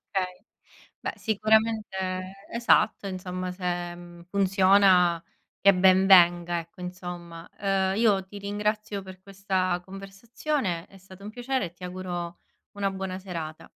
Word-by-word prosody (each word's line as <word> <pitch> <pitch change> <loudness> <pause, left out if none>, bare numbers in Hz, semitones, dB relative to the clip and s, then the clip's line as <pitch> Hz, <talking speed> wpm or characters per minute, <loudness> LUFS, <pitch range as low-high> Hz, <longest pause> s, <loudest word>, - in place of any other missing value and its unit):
Okay. 185 -2 -4 0.6
Beh - - -3
sicuramente 220 -1 +1 0.5
esatto 235 -3 +2
insomma 185 -1 -4
se, 175 -1 -3
mhmm, 175 0 -12
funziona 190 -2 +4 0.4
che 200 0 +6
ben 190 +1 +5
venga, 175 -2 +5
ecco, 170 +4 -14
insomma. 175 -2 -7
Ehm, 195 -1 +1
io 210 -4 +3
ti 205 +1 -9
ringrazio 210 0 -2
per 190 -1 -12
questa 190 -2 -1
conversazione, 195 - -4
è 195 - -18
stato 190 +1 -15
un 210 - -6
piacere 245 -2 -2
e 170 - -11
ti 180 - -19
auguro 175 -1 -5 0.4
una 200 -1 0
buona 190 -1 -4
serata. 165 -5 -6
190 Hz, 130 wpm, -26 LUFS, 180-200 Hz, 0.6 s, che